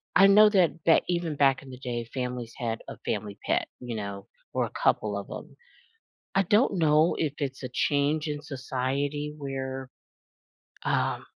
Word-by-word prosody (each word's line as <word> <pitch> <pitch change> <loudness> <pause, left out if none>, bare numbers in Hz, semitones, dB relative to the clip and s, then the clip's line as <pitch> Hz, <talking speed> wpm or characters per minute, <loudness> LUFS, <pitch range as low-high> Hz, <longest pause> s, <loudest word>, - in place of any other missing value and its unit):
I 195 +2 +8
know 210 +2 +8
that 180 -5 +2
back 165 - +5
even 170 -3 -1
back 140 -1 +3
in 135 - -12
the 125 - -10
day, 120 -3 -4
families 125 -3 -4
had 115 -2 -2
a - - -8
family 100 -2 -3
pet, - - +1
you 120 -2 -5
know, 100 -2 -5 0.3
or - - +1
a - - -8
couple 105 -1 +2
of 100 - -6
'em. - - -10 0.8
I 195 - +4
don't 205 +2 +3
know 155 0 +4
if 150 -4 0
it's 135 -2 -3
a 130 - -4
change 145 +4 +1
in 150 -1 -3
society 140 +2 -2
where, 135 -2 -5 1.0
um - - 0
140 Hz, 170 wpm, -27 LUFS, 125-155 Hz, 1.0 s, I